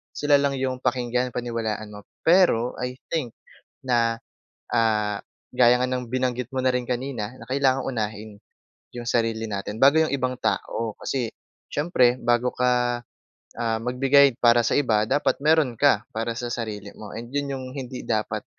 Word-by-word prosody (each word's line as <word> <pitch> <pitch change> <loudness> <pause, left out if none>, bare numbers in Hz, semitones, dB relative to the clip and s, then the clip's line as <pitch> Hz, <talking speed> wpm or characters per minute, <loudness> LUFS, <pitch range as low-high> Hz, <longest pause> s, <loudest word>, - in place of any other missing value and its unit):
sila 145 0 +3
lang 140 -1 +1
yung 130 -1 -2
pakinggan, 125 0 0
paniwalaan 115 -3 -3
mo. 105 -1 -10 0.2
Pero, 165 -9 +4
I 125 0 -3 0.2
think, 150 -8 -1 0.5
na, 115 -3 +1 0.5
ah, 105 -3 +1 0.3
gaya 125 0 +5
nga - - +3
ng 125 -2 -3
binanggit 125 -1 -1
mo 130 - 0
na 130 - +3
rin 125 -1 -1
kanina 125 -3 -3
na - - -11
kailangang 135 0 +1
unahin 110 -3 -3 0.6
yung 120 -1 -6
sarili 115 -1 0
natin 100 +1 -4
bago 140 +4 +7
yung 160 - +2
ibang 130 -2 0
tao. 115 -2 -2
Kasi 125 -4 -2 0.4
siyempre 130 -6 +2
bago 120 +1 +2
ka, 125 -1 +1 0.6
ah, 115 -1 -1
magbigay 135 +2 +4
para 120 0 +5
sa - - +1
iba, 115 -7 +2
dapat 145 +2 +1
meron 155 -4 +3
ka 120 -4 +3
para 115 +1 -2
sa 120 0 -4
sarili 105 -3 -5
mo, 105 -2 -10
and 120 +1 -7
'yon 145 -1 -1
yung 130 -1 -5
hindi 130 -2 -6
dapat 110 -2 -1
125 Hz, 160 wpm, -24 LUFS, 115-130 Hz, 0.6 s, bago